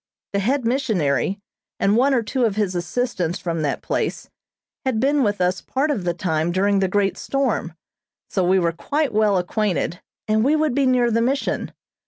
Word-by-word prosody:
The 200 Hz, -, +1 dB
head 250 Hz, +5 st, 0 dB
missionary, 200 Hz, -, +1 dB, 0.4 s
and 200 Hz, +1 st, +3 dB
one 265 Hz, +3 st, +3 dB
or 235 Hz, -, +1 dB
two 255 Hz, +3 st, -1 dB
of 210 Hz, -3 st, 0 dB
his 205 Hz, -3 st, 0 dB
assistants 175 Hz, -1 st, -2 dB
from 165 Hz, -2 st, -3 dB
that 145 Hz, -2 st, -2 dB
place, -, -, -2 dB, 0.5 s
had 260 Hz, -5 st, 0 dB
been 280 Hz, +4 st, +2 dB
with 205 Hz, -4 st, +1 dB
us 180 Hz, +1 st, +1 dB
part 285 Hz, +3 st, -1 dB
of 205 Hz, -11 st, -2 dB
the 175 Hz, -, +1 dB
time 165 Hz, -2 st, 0 dB
during 200 Hz, +2 st, +2 dB
the 190 Hz, -, +2 dB
great 195 Hz, 0 st, 0 dB
storm, 255 Hz, -11 st, -1 dB, 0.5 s
so 190 Hz, -, 0 dB
we 185 Hz, +2 st, +3 dB
were 170 Hz, -2 st, +2 dB
quite 285 Hz, -, -1 dB
well 210 Hz, -2 st, +3 dB
acquainted, 180 Hz, -2 st, -1 dB, 0.3 s
and 215 Hz, 0 st, +2 dB
we 285 Hz, +5 st, +3 dB
would 310 Hz, -3 st, +1 dB
be 275 Hz, 0 st, +2 dB
near 245 Hz, -2 st, +3 dB
the 230 Hz, +1 st, +2 dB
Mission. 270 Hz, +4 st, -1 dB
210 Hz, 190 wpm, -22 LUFS, 180-255 Hz, 0.5 s, and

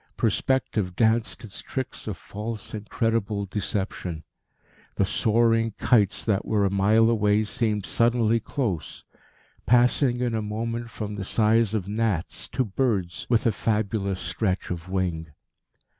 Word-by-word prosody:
Perspective 110 Hz, -8 st, 0 dB
danced 110 Hz, -1 st, +1 dB
its 100 Hz, -4 st, -7 dB
tricks 130 Hz, -4 st, -5 dB
of 105 Hz, -5 st, -3 dB
false, 105 Hz, +4 st, -6 dB
incredible 110 Hz, -1 st, -1 dB
deception. 95 Hz, -4 st, -3 dB, 0.7 s
The 100 Hz, -, +2 dB
soaring 115 Hz, +2 st, +2 dB
kites 105 Hz, -5 st, +2 dB
that 100 Hz, -3 st, +1 dB
were 105 Hz, -2 st, +1 dB
a 95 Hz, -, +1 dB
mile 105 Hz, +3 st, +4 dB
away 105 Hz, -2 st, +3 dB
seemed 105 Hz, -1 st, -1 dB
suddenly 115 Hz, -1 st, +2 dB
close, 110 Hz, -, -3 dB, 0.6 s
passing 125 Hz, +1 st, +4 dB
in 120 Hz, -2 st, 0 dB
a 110 Hz, -, 0 dB
moment 115 Hz, +2 st, -3 dB
from 105 Hz, -2 st, -5 dB
the 100 Hz, -, -3 dB
size 110 Hz, +1 st, +2 dB
of 100 Hz, -3 st, -2 dB
gnats 105 Hz, -4 st, -1 dB
to 130 Hz, -, -1 dB
birds 100 Hz, -5 st, -1 dB
with 115 Hz, -2 st, +2 dB
a 115 Hz, -, +4 dB
fabulous 105 Hz, -3 st, -1 dB
stretch 95 Hz, -5 st, -2 dB
of 90 Hz, 0 st, -5 dB
wing. 90 Hz, -4 st, -1 dB
110 Hz, 135 wpm, -25 LUFS, 100-115 Hz, 0.7 s, mile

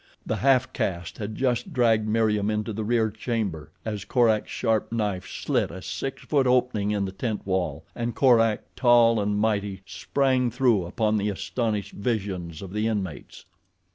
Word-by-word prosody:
The -, -, -1 dB
half 130 Hz, -1 st, +3 dB
caste 85 Hz, -2 st, -3 dB
had 105 Hz, 0 st, -4 dB
just 130 Hz, -, -1 dB
dragged 115 Hz, -4 st, +3 dB
Meriem 105 Hz, -2 st, +2 dB
into 105 Hz, +1 st, -2 dB
the 110 Hz, +1 st, -3 dB
rear 110 Hz, 0 st, +1 dB
chamber 105 Hz, -8 st, -3 dB, 0.2 s
as 105 Hz, -3 st, -3 dB
Korak's 115 Hz, -4 st, +2 dB
sharp 110 Hz, -2 st, 0 dB
knife 105 Hz, -5 st, -2 dB
slit -, -, -1 dB
a 95 Hz, -, -8 dB
six 115 Hz, +8 st, -5 dB
foot 140 Hz, -4 st, +2 dB
opening 125 Hz, -5 st, +2 dB
in 105 Hz, -1 st, 0 dB
the 95 Hz, -, -4 dB
tent 110 Hz, +2 st, -4 dB
wall, 95 Hz, -4 st, -2 dB
and 120 Hz, 0 st, -3 dB
Korak, 115 Hz, -5 st, +4 dB
tall 120 Hz, -2 st, +5 dB
and 105 Hz, 0 st, 0 dB
mighty, 105 Hz, -2 st, -1 dB
sprang 130 Hz, -1 st, 0 dB
through 120 Hz, -6 st, +2 dB
upon 110 Hz, +3 st, 0 dB
the 105 Hz, 0 st, 0 dB
astonished 100 Hz, +1 st, -2 dB
visions 95 Hz, -7 st, -3 dB
of 95 Hz, -1 st, -8 dB
the 105 Hz, +1 st, 0 dB
inmates. 100 Hz, -8 st, -4 dB
110 Hz, 165 wpm, -25 LUFS, 100-120 Hz, 0.2 s, tall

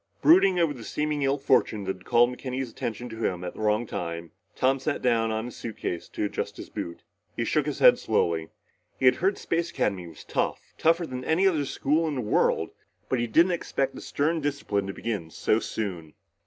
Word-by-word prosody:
Brooding 300 Hz, -, +6 dB
over 165 Hz, -4 st, +2 dB
the 120 Hz, -4 st, -10 dB
seeming 150 Hz, +4 st, -2 dB
ill 135 Hz, +1 st, +2 dB
fortune 120 Hz, -6 st, +2 dB
that 95 Hz, 0 st, -3 dB
had 95 Hz, -, -20 dB
called 120 Hz, +1 st, +4 dB
McKenny's 130 Hz, -1 st, -4 dB
attention 115 Hz, +2 st, -4 dB
to 110 Hz, -, -8 dB
him 90 Hz, -1 st, -1 dB
at 90 Hz, -, -5 dB
the -, -, -12 dB
wrong 110 Hz, +2 st, +1 dB
time, 85 Hz, -4 st, -5 dB, 0.2 s
Tom 135 Hz, +1 st, +2 dB
sat 145 Hz, +2 st, -1 dB
down 115 Hz, -2 st, +2 dB
on 110 Hz, +1 st, -2 dB
his 125 Hz, -, -8 dB
suitcase 100 Hz, -6 st, -5 dB
to -, -, -2 dB
adjust 105 Hz, -, -4 dB
his -, -, -9 dB
boot. 85 Hz, 0 st, -6 dB, 0.3 s
He -, -, -1 dB
shook -, -, +1 dB
his -, -, -2 dB
head -, -, +7 dB
slowly. 80 Hz, -1 st, 0 dB, 0.5 s
He -, -, 0 dB
had 125 Hz, -, +6 dB
heard 195 Hz, +3 st, +1 dB
Space 170 Hz, 0 st, -1 dB
Academy 95 Hz, -, -1 dB
was 80 Hz, -, -12 dB
tough, -, -, -2 dB
tougher 165 Hz, +2 st, +3 dB
than 130 Hz, -4 st, -6 dB
any 170 Hz, +5 st, +2 dB
other 160 Hz, -7 st, +3 dB
school 155 Hz, +4 st, +1 dB
in 150 Hz, -, -2 dB
the 130 Hz, -, -1 dB
world, 105 Hz, -, +1 dB, 0.4 s
but 130 Hz, -, +1 dB
he 120 Hz, -, 0 dB
didn't 170 Hz, +10 st, +4 dB
expect 140 Hz, -5 st, -1 dB
the -, -, -9 dB
stern 160 Hz, +3 st, 0 dB
discipline 140 Hz, -9 st, -1 dB
to 95 Hz, -, -4 dB
begin 100 Hz, -9 st, -4 dB
so 110 Hz, +6 st, +1 dB
soon. 90 Hz, -10 st, -5 dB
125 Hz, 210 wpm, -27 LUFS, 100-150 Hz, 0.5 s, head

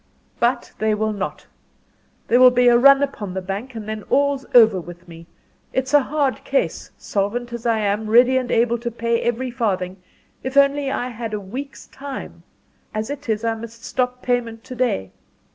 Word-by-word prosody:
"But 240 Hz, +1 st, 0 dB
they 215 Hz, 0 st, +1 dB
will 215 Hz, 0 st, -1 dB
not. 200 Hz, -2 st, -5 dB, 0.8 s
There 245 Hz, -, +4 dB
will 255 Hz, 0 st, +9 dB
be 245 Hz, 0 st, +3 dB
a 240 Hz, -, +6 dB
run 275 Hz, +3 st, +6 dB
upon 210 Hz, -9 st, -4 dB
the -, -, -1 dB
bank 205 Hz, +7 st, -5 dB
and 215 Hz, -2 st, -7 dB
then 215 Hz, 0 st, -4 dB
all's 280 Hz, -1 st, +1 dB
over 220 Hz, -6 st, +7 dB
with 175 Hz, +2 st, -12 dB
me. 165 Hz, 0 st, -12 dB, 0.5 s
It's 260 Hz, +2 st, -1 dB
a 290 Hz, -, +7 dB
hard 280 Hz, -1 st, -1 dB
case 275 Hz, -, -1 dB
solvent 235 Hz, +4 st, -2 dB
as 235 Hz, 0 st, -4 dB
I 230 Hz, -1 st, +2 dB
am 210 Hz, +1 st, -1 dB
ready 245 Hz, +3 st, +5 dB
and 255 Hz, -1 st, 0 dB
able 235 Hz, +1 st, +2 dB
to 235 Hz, +1 st, -3 dB
pay 235 Hz, 0 st, -1 dB
every 240 Hz, +2 st, -1 dB
farthing 190 Hz, -6 st, -2 dB, 0.4 s
if 260 Hz, +2 st, -4 dB
only 280 Hz, 0 st, +4 dB
I 255 Hz, -2 st, -2 dB
had 225 Hz, -2 st, -5 dB
a -, -, -3 dB
week's 255 Hz, +8 st, -8 dB
time. 275 Hz, -1 st, -8 dB, 0.5 s
As 215 Hz, +4 st, -2 dB
it 285 Hz, -3 st, -7 dB
is 220 Hz, 0 st, 0 dB
I 230 Hz, 0 st, +1 dB
must 230 Hz, +2 st, -10 dB
stop 250 Hz, 0 st, -2 dB
payment 235 Hz, -2 st, -1 dB
to 255 Hz, -, -9 dB
day. 225 Hz, -, -1 dB
235 Hz, 190 wpm, -21 LUFS, 215-260 Hz, 0.8 s, will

